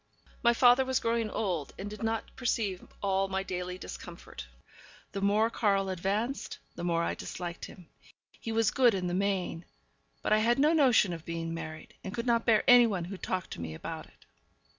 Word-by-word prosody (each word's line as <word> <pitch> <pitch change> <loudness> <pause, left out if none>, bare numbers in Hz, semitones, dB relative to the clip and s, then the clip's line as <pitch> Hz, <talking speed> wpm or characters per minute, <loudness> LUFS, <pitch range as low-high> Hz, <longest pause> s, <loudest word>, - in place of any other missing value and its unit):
My 235 - +5
father 245 +2 +6
was 260 0 0
growing 230 -1 0
old, 180 -10 -2
and 195 - -5
did 210 +1 -8
not 225 0 -2
perceive 215 -7 -1 0.2
all 195 0 +1
my 190 0 -2
daily 180 -1 -4
discomfort. 65 - -9 0.6
The 195 - -4
more 210 +3 +3
Karl 195 -4 +1
advanced, 200 +8 -2 0.2
the - - -7
more 170 -1 +1
I - - 0
disliked 175 -1 -6
him. 180 -4 -13 0.5
He 225 - -5
was 225 -1 +2
good 245 -5 +4
in 185 -1 -2
the 175 - -1
main, 185 -3 -1 0.6
but - - +2
I 215 - +5
had 235 +2 +3
no 300 +4 +4
notion 250 - +4
of 165 -2 -7
being 165 -1 -4
married, 155 -1 -7
and 190 - -5
could 235 0 -3
not 235 -1 +1
bear 220 -2 +5
any 245 -1 +8
one 185 -6 -2
who 195 +3 -6
talked 185 0 -3
to - - -6
me 80 -1 -5
about - - -6
it. - - -24
200 Hz, 195 wpm, -30 LUFS, 180-230 Hz, 0.6 s, any